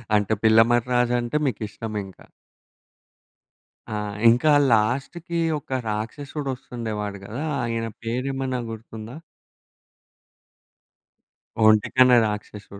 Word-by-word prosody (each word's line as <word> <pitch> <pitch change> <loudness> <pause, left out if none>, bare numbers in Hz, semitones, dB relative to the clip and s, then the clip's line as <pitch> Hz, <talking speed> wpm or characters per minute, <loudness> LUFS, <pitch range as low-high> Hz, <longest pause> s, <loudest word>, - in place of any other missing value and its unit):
అంటే 105 +1 +2
పిల్లమర్రి 115 +2 +4
రాజంటే 120 +2 +1
మీకిష్టమింకా. 105 -4 -5 1.7
ఆ! - - -3 0.4
ఇంకా 125 +7 +4 0.2
లాస్ట్‌కి 135 +10 0 0.2
ఒక 130 -2 -3
రాక్షసుడు 135 +7 -4
వస్తుండేవాడు 110 -5 -5
గదా! 120 +9 -5 0.2
ఆయన 115 -1 -2 0.2
పేరేమన్నా 130 +2 -2
గుర్తుందా? 110 +1 -9 2.5
ఒంటికన్ను 115 +4 +5
రాక్షసుడు. 105 -1 -6
115 Hz, 75 wpm, -24 LUFS, 110-130 Hz, 2.5 s, ఒంటికన్ను